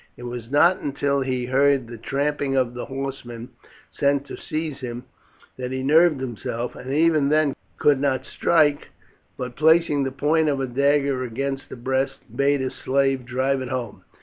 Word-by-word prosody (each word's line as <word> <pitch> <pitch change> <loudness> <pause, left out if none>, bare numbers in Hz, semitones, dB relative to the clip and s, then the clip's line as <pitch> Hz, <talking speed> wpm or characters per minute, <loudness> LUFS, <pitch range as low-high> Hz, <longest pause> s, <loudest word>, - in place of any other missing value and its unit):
It 120 - -10
was 120 -1 -6
not 170 +6 +4
until 140 0 -1
he 130 -2 -1
heard 135 0 +3
the 120 +1 -9
trampling 140 +3 -1
of 125 -2 +1
the 125 - -5
horsemen 130 -3 -6 0.4
sent 140 0 +1
to - - -8
seize 155 -3 -4
him 120 -2 -6 0.5
that 125 0 -4
he 130 0 -3
nerved 155 +1 +4
himself, 120 -1 -4
and 130 +1 -7
even 155 -1 +3
then 150 -2 +2 0.2
could 145 -2 +3
not 135 -2 0
strike, 150 -4 +2 0.5
but 125 -1 -5
placing 160 -1 +4
the 135 -1 -1
point 155 +3 +2
of 140 -2 0
a 135 - 0
dagger 140 +1 +1
against 135 +3 -4
his - - -8
breast, 130 +2 -1 0.2
bade 140 -1 +2
a 130 - -2
slave 135 -1 0
drive 130 +1 0
it 130 - -5
home. 125 -5 -5
135 Hz, 175 wpm, -23 LUFS, 130-145 Hz, 0.5 s, not